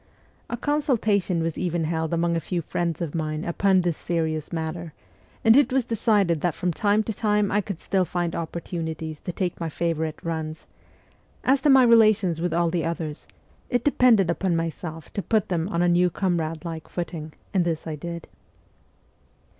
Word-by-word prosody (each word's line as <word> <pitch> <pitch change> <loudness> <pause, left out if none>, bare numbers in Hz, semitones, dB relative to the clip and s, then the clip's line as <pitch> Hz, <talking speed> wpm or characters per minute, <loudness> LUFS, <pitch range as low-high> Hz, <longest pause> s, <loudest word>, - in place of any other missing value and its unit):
A 235 - -3
consultation 220 - +1
was 165 -1 -2
even 175 -2 -1
held 160 0 -1
among 170 0 +1
a - - +1
few 170 0 -3
friends 170 +1 -2
of 155 - -4
mine 155 -1 -2
upon 190 +2 +3
this 175 -2 0
serious 160 -3 -2
matter, 165 -1 -4 0.5
and 225 +1 +7
it 285 -1 +5
was 260 -2 +2
decided 205 -8 +2
that 175 -3 0
from 180 -1 -1
time 205 +4 +2
to 220 - -3
time 210 -1 +1
I 205 - +2
could 195 -4 -6
still 190 -1 +1
find 175 -1 -2
opportunities 160 -2 -4
to - - -5
take 180 0 -3
my 165 -1 -2
favourite 160 -1 -2
runs; 160 -1 -4 0.8
as 265 +1 +3
to 295 - +3
my 265 -2 +7
relations 215 -8 +4
with 175 0 0
all 170 0 +1
the 170 -2 0
others, 165 -2 -4 0.4
it 245 -2 +1
depended 235 - +4
upon 175 +1 0
myself 165 -1 -4
to 200 - -2
put 220 0 +1
them 175 0 -1
on 175 -4 +1
a - - +3
new 175 +1 +4
comrade 165 -3 -1
like 165 -2 -6
footing, 165 -3 -5 0.2
and 185 -3 +3
this 165 -2 -2
I 160 - -4
did. 170 +2 -7
170 Hz, 180 wpm, -25 LUFS, 165-200 Hz, 0.8 s, and